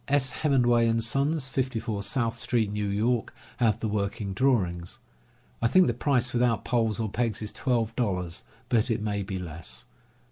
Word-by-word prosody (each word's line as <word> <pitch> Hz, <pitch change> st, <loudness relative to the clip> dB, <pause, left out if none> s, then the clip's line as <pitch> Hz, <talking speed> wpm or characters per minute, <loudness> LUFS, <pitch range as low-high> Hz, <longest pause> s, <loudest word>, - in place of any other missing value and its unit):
S. 140 Hz, -2 st, +2 dB
Hem 150 Hz, -, +2 dB
menway 120 Hz, -1 st, +4 dB
and 115 Hz, 0 st, +1 dB
Son, 140 Hz, +7 st, +1 dB
54 125 Hz, -6 st, -2 dB
South 115 Hz, +3 st, 0 dB
St., 115 Hz, -3 st, 0 dB
New 105 Hz, -1 st, -1 dB
York, 110 Hz, +4 st, 0 dB, 0.2 s
have 115 Hz, -4 st, +2 dB
the 110 Hz, -, 0 dB
working 100 Hz, -1 st, -2 dB
drawings. 95 Hz, -8 st, 0 dB, 0.6 s
I -, -, +4 dB
think 185 Hz, +9 st, +5 dB
the 120 Hz, -, +1 dB
price, 125 Hz, 0 st, +1 dB
without 120 Hz, -1 st, +1 dB
poles 115 Hz, -3 st, +1 dB
or 110 Hz, -, 0 dB
pegs, 115 Hz, 0 st, -1 dB
is 105 Hz, -, -5 dB
twelve 115 Hz, -4 st, 0 dB
dollars, 90 Hz, -, -2 dB, 0.2 s
but 115 Hz, +1 st, +2 dB
it 115 Hz, -, +1 dB
may 105 Hz, -1 st, -1 dB
be 95 Hz, 0 st, -4 dB
less. 80 Hz, -8 st, -7 dB
115 Hz, 175 wpm, -27 LUFS, 100-125 Hz, 0.6 s, think